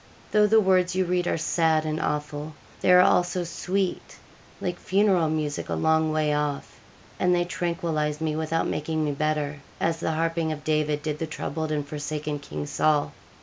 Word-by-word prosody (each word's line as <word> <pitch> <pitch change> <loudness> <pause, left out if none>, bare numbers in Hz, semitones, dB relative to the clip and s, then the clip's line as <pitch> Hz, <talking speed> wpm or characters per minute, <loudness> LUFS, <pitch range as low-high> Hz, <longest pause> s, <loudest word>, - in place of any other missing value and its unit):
Though 210 0 +5
the 220 +1 +5
words 185 -3 +3
you 185 0 +2
read 180 0 0
are - - +1
sad 160 -1 +2
and 155 0 -2
awful, 150 +1 -3 0.2
they - - +3
are 180 0 +8
also 180 0 +3
sweet, 185 +3 -3 0.4
like 180 -1 -3
funeral 190 -4 +2
music 155 -2 -2
a - - 0
long 160 0 +2
way 155 -1 +1
off, 150 -1 -3 0.4
and 180 -1 +3
they 175 0 +1
tranquillise 165 -4 -2
me 155 -1 -1
without 160 +1 0
making 155 +1 -1
me 145 - 0
better, 150 0 -1 0.2
as 165 0 0
the 160 - -1
harping 165 0 0
of 150 -1 -5
David 150 -1 0
did 150 -1 -3
the 160 - -2
troubled 155 0 -4
and 145 -2 -2
forsaken 150 0 -4
King 140 +1 -6
Saul.' 150 0 +1
155 Hz, 180 wpm, -26 LUFS, 150-175 Hz, 0.4 s, are